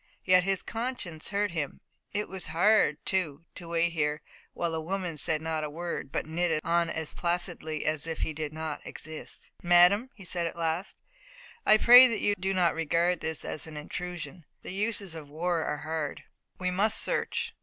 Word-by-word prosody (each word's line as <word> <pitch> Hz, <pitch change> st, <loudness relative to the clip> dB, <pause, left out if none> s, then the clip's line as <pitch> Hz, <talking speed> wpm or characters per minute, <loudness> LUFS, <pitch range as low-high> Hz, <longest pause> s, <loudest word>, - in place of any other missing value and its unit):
Yet 185 Hz, -1 st, +5 dB
his 195 Hz, -1 st, 0 dB
conscience 225 Hz, -9 st, -4 dB
hurt 205 Hz, -1 st, 0 dB
him. 155 Hz, -5 st, -3 dB, 0.3 s
It 210 Hz, 0 st, -2 dB
was 190 Hz, -2 st, -6 dB
hard, 180 Hz, -3 st, +4 dB
too, 170 Hz, -5 st, -1 dB
to 175 Hz, -, -9 dB
wait 170 Hz, 0 st, +1 dB
there, 150 Hz, -1 st, 0 dB, 0.3 s
while 170 Hz, -1 st, -1 dB
the 160 Hz, 0 st, -2 dB
woman 180 Hz, 0 st, -3 dB
said 155 Hz, +1 st, -1 dB
not 160 Hz, -1 st, -2 dB
a 150 Hz, -, -3 dB
word, 165 Hz, -3 st, -5 dB
but -, -, -2 dB
knitted 160 Hz, 0 st, 0 dB
on 170 Hz, 0 st, +2 dB
as 160 Hz, -1 st, -3 dB
placidly 170 Hz, -3 st, -2 dB
as 155 Hz, 0 st, -1 dB
if 160 Hz, -1 st, -4 dB
he 160 Hz, -, -2 dB
did 155 Hz, -1 st, -4 dB
not 155 Hz, -1 st, -5 dB
exist. 155 Hz, 0 st, -9 dB
"Madame," 180 Hz, +7 st, +5 dB
he 195 Hz, -5 st, -12 dB
said 170 Hz, -1 st, -1 dB
at -, -, -6 dB
last, 165 Hz, +3 st, -2 dB, 0.7 s
"I 215 Hz, -, +8 dB
pray 245 Hz, +3 st, +10 dB
that 230 Hz, -3 st, -1 dB
you 205 Hz, -, +3 dB
do 190 Hz, +1 st, 0 dB
not 180 Hz, -3 st, +3 dB
regard 170 Hz, +2 st, +1 dB
this 160 Hz, -1 st, -3 dB
as 155 Hz, -, -2 dB
an 155 Hz, -1 st, -8 dB
intrusion. 175 Hz, +2 st, -6 dB, 0.2 s
The -, -, -6 dB
uses 205 Hz, -2 st, 0 dB
of 155 Hz, -3 st, -8 dB
war 165 Hz, +2 st, -1 dB
are 150 Hz, -, -2 dB
hard. 155 Hz, 0 st, -4 dB, 0.3 s
We 180 Hz, 0 st, -1 dB
must 215 Hz, +4 st, +2 dB
search. -, -, -1 dB
170 Hz, 185 wpm, -29 LUFS, 160-185 Hz, 0.7 s, pray